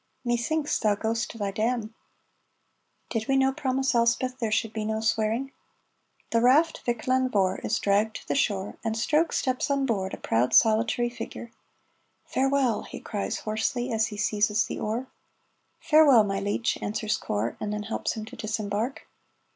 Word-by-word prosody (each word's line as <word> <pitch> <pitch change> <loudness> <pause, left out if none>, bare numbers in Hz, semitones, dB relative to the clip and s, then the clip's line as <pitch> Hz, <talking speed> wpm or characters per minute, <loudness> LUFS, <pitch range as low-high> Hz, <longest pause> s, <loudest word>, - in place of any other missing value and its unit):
"Methinks 285 +6 0
thou 210 -2 +2
ghost 225 +2 -2
to - - -9
thy 200 -2 -2
damn. 220 +1 -1 1.2
(Did 220 -2 -2
we 270 - +3
no 265 0 +3
promise 265 -1 0
Elspeth 240 +2 +1
there 225 -3 -1
should 220 0 0
be 220 - -3
no 220 0 -1
swearing?)" 225 +4 0 0.8
The 230 - +3
raft 295 +7 +4
Vick 235 -2 -1
Lan 255 0 +2
Vohr 190 -5 +1
is - - -1
dragged 205 +2 +1
to - - -8
the - - 0
shore, 205 -7 -1
and 225 -1 -1
Stroke 305 +8 +2
steps 255 +1 -1
on 280 -1 +1
board, 195 -6 -1
a - - -15
proud 115 +3 +1
solitary 230 +2 +3
figure. 235 -1 -8 0.7
"Farewell!" 270 -3 +1
he - - -9
cries 205 -2 -4
hoarsely, 225 +4 -1
as 220 0 +2
he 210 - -8
seizes 210 +1 +1
the - - -5
oar. 225 +4 -2 0.7
"Farewell, 295 -7 +6
my 195 -1 -1
leech," 205 +3 -1
answers 215 +1 -1
Corp, 105 +3 -2
and 210 - -3
then 210 0 -3
helps 220 - -2
him 215 -1 -6
to - - -11
disembark. 215 +3 -3
225 Hz, 170 wpm, -26 LUFS, 215-255 Hz, 1.2 s, Farewell